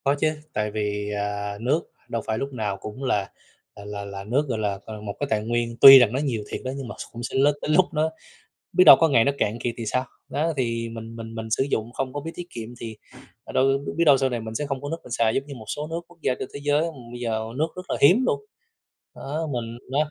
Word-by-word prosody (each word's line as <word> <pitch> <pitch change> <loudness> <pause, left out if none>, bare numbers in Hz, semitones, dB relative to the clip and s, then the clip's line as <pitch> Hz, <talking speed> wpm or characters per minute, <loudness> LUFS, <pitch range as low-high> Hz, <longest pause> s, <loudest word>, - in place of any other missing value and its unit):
Có 140 0 +3
chứ, 155 - +3 0.3
tại 105 0 -1
vì, 105 -1 -2
à, 100 0 -3
nước 135 +8 +2 0.3
đâu 115 - -2
phải 110 - -1
lúc 135 +3 -4
nào 105 -5 -2
cũng 105 +7 -8
là 105 -7 0 0.5
là 100 - -11
là 105 -1 -5
là 100 -1 -7
nước, 130 +8 +1
gọi 115 -3 -1
là, 100 -2 -1
ờ, 110 -1 -8
một 100 -1 -5
cái 145 - -1
tài 105 -4 +1
nguyên, 120 +1 -1
tuy 135 -1 +13
rằng 120 -3 +4
nó 130 - 0
nhiều 125 -7 -1
thiệt - - -4
đó 130 - -1
nhưng 135 -3 -5
mà - - -7 0.2
cũng 120 +1 -7
sẽ - - -4
l 135 - +5 0.2
tới - - -4
lúc 180 +4 +6
nó 155 +1 +1 0.6
biết 185 - +6
đâu - - +11
có 165 - +5
ngày 120 -6 +4
nó 140 - +2
cạn 105 +3 0
kiệt 120 -1 -2
thì 115 - -3
sao? 130 +4 0 0.2
Đó, 160 +3 0
thì 115 -3 -1
mình 115 0 -8
mình 115 0 -8
mình 110 -1 -6
sử 110 - +2
dụng 115 0 -1
không 130 +1 -3
có 145 - -4
biết 160 +3 -5
tiết 175 - -7
kiệm 115 -5 -6
thì, 110 -2 -6 0.5
ờ, - - -9
đâu 130 - +3 0.3
biết 170 - +3
đâu 145 -4 +6
sau 135 - +2
này 120 -2 -3
mình 110 0 -7
sẽ 145 +6 -2
không 135 -2 -3
có 145 - -4
nước 165 - -1
mình - - -13
xài, 115 -1 +2
giống 135 - -1
như 140 - -8
một 115 -4 -10
số 150 - -3
nước, 165 +1 -2
quốc 175 0 -19
gia 125 - +2
trên - - -5
thế 140 - -6
giới 145 +1 +3 0.3
bây 120 - -7
giờ 115 -2 -1 0.2
nước 155 +3 +2
rất 180 0 -8
là - - +1
hiếm 185 - +6
luôn. 435 - +1 0.8
Đó, 155 +4 -3
mình 115 -1 -4
đó, 150 +2 +1
120 Hz, 275 wpm, -24 LUFS, 110-140 Hz, 0.8 s, tuy